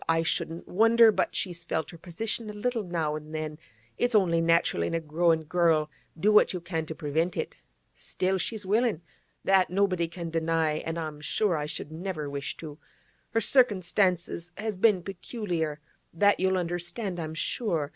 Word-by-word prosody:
I 165 0 +3
shouldn't 165 +1 -2
wonder 225 +3 +6
but - - -1
she's 175 -3 -2
felt 160 -1 -2
her 170 - -11
position 215 +6 -4
a - - -6
little 230 +2 -1
now 165 -5 -2
an' 155 0 -8
then; 155 -1 -4 0.4
it's 245 -1 +2
only 170 -5 +4
natural 165 - +2
in 85 - -1
a - - +1
growin' 160 +1 +1
girl, 160 -2 +2 0.3
do 210 +6 +4
what 210 - +5
you 180 - -3
can 165 -2 -3
to 160 - -5
prevent 160 +4 -1
it. - - -4 0.4
Still, 190 +1 -1
she's 215 +2 -3
willin'; 210 -3 +1 0.4
that 190 -3 +4
nobody 185 -2 +1
can 170 0 -6
deny, 160 -1 +1
an' 165 +1 -4
I'm 155 -2 -5
sure 190 +4 +1
I 150 -1 -2
should 150 - -5
never 160 -2 -4
wish 140 0 -4
to. 155 -2 -9 0.5
Her 225 - +1
cirkinstances 185 -7 +2
has 215 0 -3
been 190 -2 +3
peculiar; 175 -5 -3 0.4
that 205 +4 +4
you'll 190 0 +2
understand, 175 +2 -3
I'm 160 -1 -4
sure. 165 -5 -1
170 Hz, 175 wpm, -28 LUFS, 160-200 Hz, 0.5 s, wonder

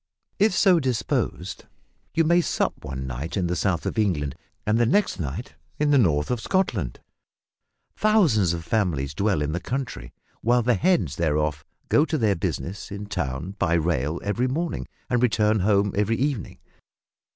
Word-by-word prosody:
If 210 0 +4
so 185 -3 +5
disposed 130 -5 -2 0.5
you 165 - +4
may 170 +2 +4
sup - - 0
one 65 0 -5
night 65 - -4
in 95 - +1
the 90 +1 -1
south 90 -1 0
of - - -1
England 75 -10 0 0.3
and 105 +2 +2
the 120 - +3
next 205 - +2
night 70 -2 -5 0.2
in 150 0 +2
the 140 - +5
north 75 -7 +2
of 120 -2 -1
Scotland. 110 - -1 0.9
Thousands 165 - +3
of 85 -1 -5
families 80 -11 0
dwell 100 -3 +1
in 75 - -2
the 85 - -1
country, 95 - -4 0.3
while 120 +1 +3
the 125 +2 +3
heads 105 - +1
thereof 75 -3 0 0.2
go 145 - +4
to 160 - -1
their 110 -6 +2
business 95 +5 -4
in 100 +1 -5
town 75 -2 -3
by 85 -3 +2
rail 80 -2 0
every 115 +5 0
morning 165 +6 -2 0.2
and 125 -2 +1
return 110 -3 +3
home 100 0 +2
every 105 +3 +1
evening. 135 - -2
100 Hz, 165 wpm, -25 LUFS, 80-125 Hz, 0.9 s, so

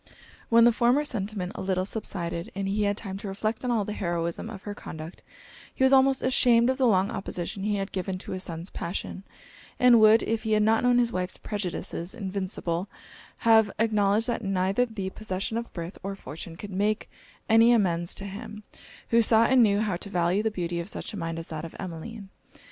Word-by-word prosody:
When 230 0 +6
the 240 - +7
former 245 +5 +3
sentiment 200 -7 -3
a - - -6
little 185 -1 0
subsided, 170 -5 -4
and 195 0 -2
he 205 +2 0
had 205 0 0
time 195 -3 -6
to 205 - -7
reflect 215 +4 -3
on 250 - -1
all 225 -4 +1
the 210 - -4
heroism 170 +1 -2
of 200 -4 -9
her 205 - -5
conduct, 160 -3 -9 0.5
he - - 0
was 265 +1 +5
almost 270 0 +4
ashamed 245 -1 +4
of 260 - -3
the 260 - +4
long 195 -1 +3
opposition 190 -3 -4
he 210 +1 0
had 195 0 -3
given 185 0 -3
to - - -9
his 185 - -4
son's 170 0 -6
passion; 180 +2 -4 0.6
and 250 -2 +7
would, 220 +1 +6
if 225 -1 -1
he 220 -1 -1
had 210 0 +3
not 220 +1 +3
known 245 0 +3
his 240 -1 +2
wife's 180 -1 -2
prejudices 190 -2 -4
invincible, 190 -3 -3 0.6
have 220 -2 +6
acknowledged, 215 -1 +2
that 235 -1 -2
neither 195 +5 +1
the 200 -4 -5
possession 200 +1 -4
of 235 0 -4
birth 170 +1 -7
or 195 0 -4
fortune 165 0 -9
could 200 +4 -8
make 205 +3 0 0.4
any 225 +1 +6
amends 175 -7 +1
to 200 - -6
him, 210 +2 -8 0.5
who 230 0 +5
saw 225 0 +5
and 260 +1 +5
knew 205 -2 +4
how 205 -5 -1
to 200 - -7
value 180 +1 +1
the 220 - +1
beauty 175 -4 -3
of 170 +3 -5
such - - -6
a - - -5
mind 165 -2 -3
as 165 - -6
that 155 -1 -5
of 165 - -8
Emmeline. 190 +4 -7
200 Hz, 210 wpm, -27 LUFS, 185-225 Hz, 0.6 s, the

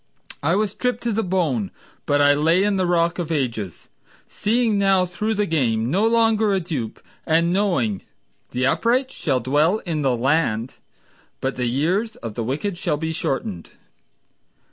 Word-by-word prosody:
I 165 +5 +2
was 210 -1 +1
stripped 250 +4 -2
to 235 - 0
the 220 +1 0
bone, 165 - 0 0.4
but 145 0 +3
I 145 0 +6
lay 165 +6 +3
in 205 -1 +1
the 185 -1 +1
Rock 170 0 +1
of 165 -2 -3
Ages, 115 - -3 0.4
Seeing 220 0 +1
now 195 -2 +3
through 210 +5 -2
the 210 0 +1
game, 120 - 0
no 200 +6 +3
longer 225 -2 +3
a 195 - +2
dupe, 150 - -4 0.2
And 170 +2 +2
knowing 170 - +1 0.5
"the 125 +1 -1
upright 250 - +1
shall 135 - -1
dwell 150 - +2
in 160 -4 -2
the 130 -4 +1
land 130 -3 0 0.6
But 135 +1 -2
the 125 -1 -1
years 180 - 0
of 115 -2 -7
the 115 - -3
wicked 155 - -3
shall 150 - 0
be 160 +1 -3
shortened." 115 - -3
165 Hz, 165 wpm, -22 LUFS, 130-200 Hz, 0.6 s, I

